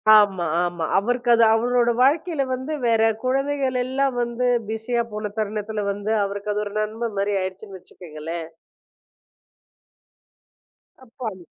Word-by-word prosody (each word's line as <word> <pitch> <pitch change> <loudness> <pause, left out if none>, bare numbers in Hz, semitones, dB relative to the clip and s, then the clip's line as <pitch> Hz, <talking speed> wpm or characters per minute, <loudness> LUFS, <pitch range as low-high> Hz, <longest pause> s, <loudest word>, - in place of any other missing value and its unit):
ஆமா 195 -4 +4 0.2
ஆமா. 175 -2 -2
அவருக்கு 240 +4 0
அது 230 - +5
அவரோட 240 +1 +2
வாழ்க்கைல 305 +2 +2
வந்து 260 +4 -4
வேற 225 -1 +3 0.2
குழந்தைகள் 270 0 0
எல்லாம் 265 0 0
வந்து 240 +1 -1 0.2
பிஸியா 235 +2 -1
போன 210 -1 -4
தருணத்துல 210 0 -2
வந்து 205 +2 -3
அவருக்கு 200 +1 -3
அது 210 +1 -1
ஒரு 205 - -7
நன்ம 220 +2 -3
மாதிரி 200 +1 0
ஆயிடுச்சுன்னு 190 +1 -6
வச்சுக்கோங்களேன். 165 -2 -8 2.6
அப்ப 240 0 -22
அம் 185 -3 -13
220 Hz, 125 wpm, -23 LUFS, 200-250 Hz, 2.6 s, அது